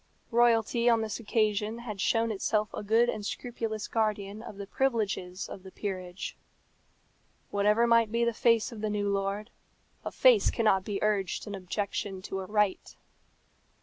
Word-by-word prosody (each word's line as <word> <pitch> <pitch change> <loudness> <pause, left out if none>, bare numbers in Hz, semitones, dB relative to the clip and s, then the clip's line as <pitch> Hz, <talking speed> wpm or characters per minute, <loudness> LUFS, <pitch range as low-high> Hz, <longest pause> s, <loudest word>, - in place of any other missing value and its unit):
Royalty 235 0 +3
on 230 -1 +4
this 220 0 -3
occasion 215 -1 0
had 215 -5 -6
shown 230 0 +2
itself 210 +1 0
a - - -4
good 225 +3 +3
and 215 -3 -2
scrupulous 220 -1 -4
guardian 210 -2 -1
of 215 -3 -9
the 200 - -6
privileges 195 -7 -1
of 190 - -9
the 190 - -11
peerage. 185 -2 -5 1.2
Whatever 210 +3 +3
might 230 -2 +4
be 235 +1 +1
the 235 - +1
face 230 +1 +2
of 225 -3 -8
the 215 - -1
new 205 -1 -1
lord, 200 +2 -2 0.5
a - - -3
face - - +5
cannot 210 -5 +2
be 200 0 -3
urged 205 -3 0
in 205 - -6
objection 195 0 -3
to 195 - -4
a 190 - -6
right. 210 -2 0
215 Hz, 160 wpm, -29 LUFS, 200-230 Hz, 1.2 s, face